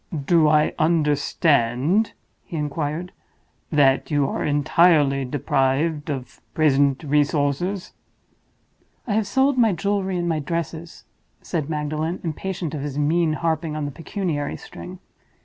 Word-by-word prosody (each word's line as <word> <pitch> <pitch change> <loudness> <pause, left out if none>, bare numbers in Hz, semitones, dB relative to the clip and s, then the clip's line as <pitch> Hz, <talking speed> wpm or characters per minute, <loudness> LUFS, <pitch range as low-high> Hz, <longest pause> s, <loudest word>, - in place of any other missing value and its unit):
"Do 165 -1 +4
I 150 0 +3
understand," 150 - +2 0.3
he 170 - -7
inquired, 150 +4 -3 0.6
"that 140 -3 +3
you 145 -3 +2
are - - -3
entirely 145 -2 +3
deprived 145 +3 0
of 130 -4 -6
present 140 -2 +3
resources?" 150 +5 0 1.1
"I 220 - -2
have 215 -1 +1
sold 270 +2 +2
my 225 -4 +4
jewelry 190 +1 -1
and 175 0 -1
my 160 -2 0
dresses," 165 +2 -5 0.4
said 155 -4 -3
Magdalen, 155 +3 -2
impatient 170 0 -4
of 150 - -4
his 145 -1 -5
mean 155 +2 +2
harping 160 -1 -1
on 155 -1 -2
the 145 - -4
pecuniary 165 -2 -3
string. 180 +1 -10
155 Hz, 125 wpm, -23 LUFS, 145-175 Hz, 1.1 s, Do